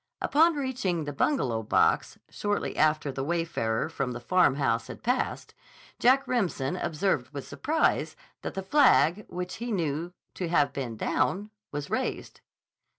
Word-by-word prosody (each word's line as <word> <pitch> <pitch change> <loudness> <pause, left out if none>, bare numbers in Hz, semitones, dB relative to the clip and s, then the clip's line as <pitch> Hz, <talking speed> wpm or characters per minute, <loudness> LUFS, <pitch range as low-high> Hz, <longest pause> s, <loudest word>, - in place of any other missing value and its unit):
Upon 325 +3 +4
reaching 250 - -1
the 145 0 -5
Bungalow 130 - +1
box, 110 - +2
shortly 205 0 -2
after 155 -2 +2
the 135 0 -4
wayfarer 160 -9 -1
from 135 -6 -3
the 120 - -5
Farmhouse 135 -6 +2
had - - -9
passed, 250 +3 -1 0.5
Jack 265 +3 +4
Remsen 180 - 0
observed 155 -7 -1
with 140 - -6
surprise 315 +2 0 0.3
that - - -5
the 195 - -3
flag, 210 - +4
which 180 0 -5
he 235 +1 -4
knew 165 -3 -1 0.2
to 180 - -3
have 150 -4 +2
been 120 -5 -4
down, 205 - 0 0.2
was 145 -1 -5
raised. - - -3
170 Hz, 145 wpm, -28 LUFS, 140-215 Hz, 0.5 s, Upon